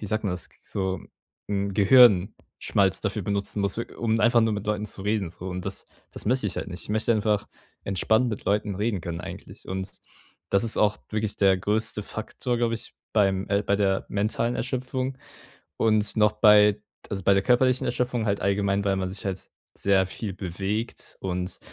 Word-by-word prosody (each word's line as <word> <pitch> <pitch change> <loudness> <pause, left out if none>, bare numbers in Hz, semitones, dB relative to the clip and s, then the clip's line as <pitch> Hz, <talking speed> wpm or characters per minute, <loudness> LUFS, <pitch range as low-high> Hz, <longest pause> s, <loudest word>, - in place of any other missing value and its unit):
wie 105 - -5
sagt 110 +2 -2
man 100 - 0
das? 90 -2 -4
So, 95 -2 -2 0.5
hm, 100 -1 -1
Gehirnschmalz 100 -3 +4
dafür 100 0 -2
benutzen 100 +2 -2
muss, 100 0 0
w 115 - -1
um 115 -1 0
einfach 120 +2 +5
nur 110 0 +2
mit 105 0 -5
Leuten 105 0 -1
zu 95 - -5
reden 105 -4 -1
so 90 +2 -8
und 90 0 -5
das - - -5 0.3
das - - -7
möchte 125 0 +2
ich - - -4
halt - - -3
nicht. 90 0 -6
Ich - - -12
möchte 110 +2 +2
einfach 105 -1 +1 0.4
entspannt 110 +5 +2
mit 105 - -5
Leuten 105 0 +1
reden 105 -1 -1
können 85 -1 -4
eigentlich. - - -10
Und 95 +1 -4 0.6
das 100 +3 +3
ist 115 - +1
auch 105 -1 +3
wirklich 110 -1 -2
der 95 -2 +4
größte 105 +2 -1
Faktor, 120 +4 -4
glaube 115 -1 +1
ich, 115 - -8 0.2
beim 95 -2 +2
äh, 100 0 +2
bei 100 0 +1
der 95 -1 +1
mentalen 110 +4 -1
Erschöpfung. 130 +1 -3 0.6
Und 110 -2 +2
noch 105 0 +4
bei 105 -1 +6
d 105 - -20 0.3
also 95 -2 -4
bei 100 - +5
der 95 - +3
körperlichen 130 +1 +3
Erschöpfung 125 -2 -1
halt 100 0 0
allgemein, 100 0 +1
weil 100 -1 +2
man 95 -1 -2
sich 95 +2 -6
halt 95 -1 -4 0.3
sehr 95 -1 +3
viel 100 +1 -5
bewegt 95 +5 -4
und 90 -1 -3
105 Hz, 195 wpm, -26 LUFS, 95-110 Hz, 0.6 s, bei